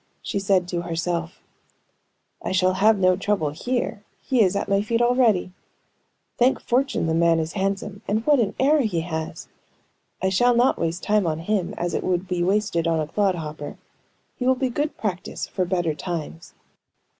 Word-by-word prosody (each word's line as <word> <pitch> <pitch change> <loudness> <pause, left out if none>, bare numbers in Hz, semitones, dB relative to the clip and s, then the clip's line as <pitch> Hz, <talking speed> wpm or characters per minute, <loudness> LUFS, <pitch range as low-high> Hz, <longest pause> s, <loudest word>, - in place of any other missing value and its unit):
She 200 - -2
said 195 -2 +2
to 175 -1 -2
herself: 170 0 -3 1.0
"I - - -3
shall 185 0 +3
have 210 +3 +4
no 185 -1 +4
trouble 195 -6 0
here; 225 - -3 0.2
he 255 -3 +1
is 195 -2 +3
at 200 - -1
my 200 0 +2
feet 230 +2 0
already. 240 -7 +3 0.9
Thank 250 +2 +3
fortune 260 -4 0
the 160 - 0
man 165 0 +3
is 160 0 -2
handsome; 195 0 -2
and 215 +2 0
what 295 -2 +4
an 215 -4 0
air 290 +3 +4
he 195 -9 0
has! 160 -1 -5 0.7
I 190 - +1
shall 245 +6 +3
not 245 +2 +3
waste 165 +2 -2
time 210 -3 +2
on 155 -1 0
him, 180 +2 -1
as 175 0 -2
it - - -1
would 180 0 -1
be 180 -1 -1
wasted 190 -2 +1
on 165 -1 +1
a 155 - 0
clod 195 +4 +1
hopper. 150 -3 -6 0.6
He 250 - -2
will 260 - +5
be 255 0 -1
good 290 +5 -2
practice 190 -4 -3
for 185 - -2
better 175 -3 0
times." 165 +1 -6
190 Hz, 180 wpm, -23 LUFS, 170-220 Hz, 1.0 s, will